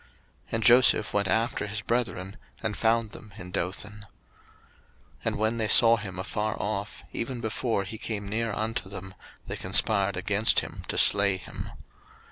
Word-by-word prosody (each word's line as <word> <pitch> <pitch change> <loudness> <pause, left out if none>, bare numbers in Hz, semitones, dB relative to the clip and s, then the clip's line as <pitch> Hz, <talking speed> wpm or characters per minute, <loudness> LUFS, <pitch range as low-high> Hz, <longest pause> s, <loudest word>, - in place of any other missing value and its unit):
And 115 0 -1
Joseph 120 -2 +5
went 100 -1 +1
after 110 0 0
his 105 +1 -4
brethren, 105 -6 -2 0.3
and - - -2
found 115 -1 +1
them 105 -1 -13
in 90 0 -9
Dothan. 95 +4 -4
01:037:018 - - -12 1.2
And - - 0
when 110 +2 0
they 110 - 0
saw 115 +2 +7
him 100 -3 -7
afar 105 +3 -3
off, 100 0 -4
even 120 +1 -4
before 115 -2 -2
he 105 +3 -8
came 105 -3 -5
near 115 +2 -1
unto 110 -1 -3
them, 95 -1 -9 0.3
they - - -5
conspired 100 -3 +2
against 100 +4 +3
him - - -9
to - - -3
slay 100 -1 +4
him. 95 - -8
105 Hz, 160 wpm, -27 LUFS, 100-115 Hz, 1.2 s, saw